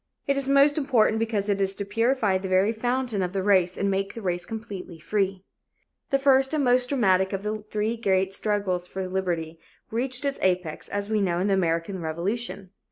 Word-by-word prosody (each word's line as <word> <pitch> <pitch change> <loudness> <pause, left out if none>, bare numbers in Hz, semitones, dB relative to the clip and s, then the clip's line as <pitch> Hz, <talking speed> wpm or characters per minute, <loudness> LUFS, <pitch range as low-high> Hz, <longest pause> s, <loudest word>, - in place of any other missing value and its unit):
It 280 - +1
is 275 -1 -1
most 280 +2 +5
important 235 -6 +2
because 220 -3 -1
it 200 -1 0
is 195 0 0
to 200 - -4
purify 225 -2 +1
the 190 - -5
very 190 +4 +3
fountain 245 -2 -1
of 180 0 -2
the 195 -1 -1
race 185 -3 +3
and 200 0 0
make 195 0 -2
the 230 - -6
race 175 -1 -2
completely 205 -6 -7
free. 195 +2 -1 0.7
The 275 - +3
first 270 +1 +3
and 295 - +1
most 250 0 +3
dramatic 190 -8 +2
of 195 0 -3
the 210 0 -3
three 215 +2 -1
great 190 -3 +1
struggles 200 -4 -1
for 190 0 -4
liberty 170 -4 -2 0.3
reached 255 +4 -1
its 280 0 -1
apex, 180 -4 -1
as 205 +1 -3
we 215 -1 +2
know, 175 -3 +1
in 180 - 0
the - - +3
American 170 0 0
Revolution. 190 +5 -3
200 Hz, 200 wpm, -25 LUFS, 185-235 Hz, 0.7 s, most